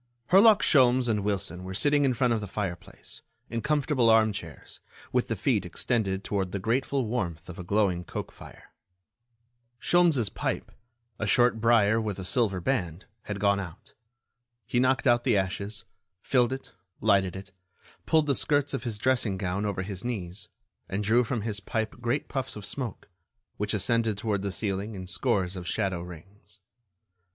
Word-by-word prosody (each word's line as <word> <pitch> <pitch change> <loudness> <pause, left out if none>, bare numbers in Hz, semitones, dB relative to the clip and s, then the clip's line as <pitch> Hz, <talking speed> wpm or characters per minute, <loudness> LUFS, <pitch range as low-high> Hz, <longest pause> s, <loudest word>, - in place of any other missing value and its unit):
Herlock 205 +3 +7
Sholmes 130 -2 +4
and 105 -3 0
Wilson 95 -3 -1
were 95 +1 -6
sitting 145 +6 +4
in 130 -2 +2
front 120 0 +2
of 110 - -1
the 105 - -5
fireplace, 95 -1 -6 0.3
in 115 0 -2
comfortable 145 -4 +2
armchairs, 105 - 0 0.3
with - - +1
the - - -1
feet - - +1
extended 100 -5 -1
toward 95 -3 -2
the 100 - -2
grateful 130 +6 0
warmth 90 -8 -3
of 90 - -8
a - - -5
glowing 95 -2 +1
coke - - -6
fire. - - -14 1.1
Sholmes' 160 - +3
pipe, - - -3 0.5
a 110 - -1
short 120 0 +3
brier 115 -1 +4
with 105 -3 -3
a 95 - -6
silver 100 -1 +1
band, 90 -5 -2 0.2
had 105 -1 -4
gone 100 -1 +2
out. 90 -2 -9 0.7
He 120 +2 0
knocked 130 +1 +2
out 120 -2 +4
the - - +3
ashes, 100 +2 -3 0.4
filled 125 -2 +2
it, 135 0 -6 0.3
lighted 100 -4 +2
it, 95 0 -9 0.6
pulled 160 -1 +4
the 140 - +2
skirts 145 +1 +1
of 135 - -3
his 115 -3 -2
dressing 115 -4 +1
gown 95 +2 -2
over 95 -2 -2
his 95 -1 -6
knees, 100 -6 -5 0.4
and 100 +2 -2
drew 115 +4 +4
from 120 -1 -2
his 105 -1 -2
pipe 110 +2 -3
great 120 +4 -1
puffs 135 -2 -4
of 105 -2 -7
smoke, 125 0 -4 0.5
which 105 +1 -1
ascended 110 +1 +2
toward 105 -2 -1
the 100 0 -2
ceiling 100 +2 -2
in 95 -1 -6
scores 90 +1 0
of 90 -1 -6
shadow 95 -2 -1
rings. 90 +5 -12
105 Hz, 170 wpm, -27 LUFS, 95-120 Hz, 1.1 s, Herlock